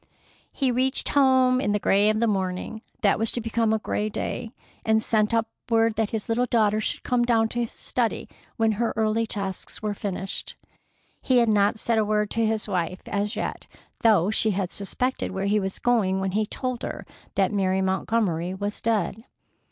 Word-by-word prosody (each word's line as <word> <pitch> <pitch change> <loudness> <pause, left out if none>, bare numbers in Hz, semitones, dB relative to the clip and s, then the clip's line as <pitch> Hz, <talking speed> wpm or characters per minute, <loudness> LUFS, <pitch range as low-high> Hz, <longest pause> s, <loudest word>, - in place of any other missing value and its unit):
He 265 -3 0
reached 260 +2 0
home 260 -2 +4
in 205 - +1
the 210 - +1
gray 205 +1 +3
of 215 0 +1
a - - +5
morning 195 +1 -2 0.2
that 200 -2 +3
was 225 0 0
to - - -1
become 230 -1 0
a 220 - +3
gray 215 0 -2
day, 220 +2 -4 0.3
and 220 0 +2
sent 215 -2 +2
up 230 0 +1 0.2
word 225 -1 +3
that 220 -1 0
his 220 -2 -4
little 245 +2 +1
daughter 215 -2 +2
should - - -2
come 245 -1 +1
down 225 -2 +2
to 240 - -3
his 235 -1 -2
study 235 -3 -2 0.3
when 225 -2 +3
her 225 +2 -1
early 220 +1 +1
tasks 195 0 -4
were 210 -1 0
finished. 195 -1 -5 0.7
He 255 - +2
had 235 -2 +4
not 205 0 +3
said 225 0 +1
a - - +3
word 210 0 0
to 230 - +1
his 220 -1 0
wife 185 -2 -2
as 205 +1 -2
yet, - - -4 0.3
though 210 -5 +4
she 220 0 +2
had 190 -3 -1
suspected 250 +6 -2
where 190 +1 -3
he 210 +1 +2
was 190 -1 -3
going 210 -6 +2
when 190 0 -1
he 215 +2 0
told 255 0 -3
her - - -5 0.3
that 195 -2 +2
Mary 190 -1 +1
Montgomery 190 -2 0
was 205 +2 -4
dead. 220 0 -1
215 Hz, 195 wpm, -25 LUFS, 200-230 Hz, 0.7 s, a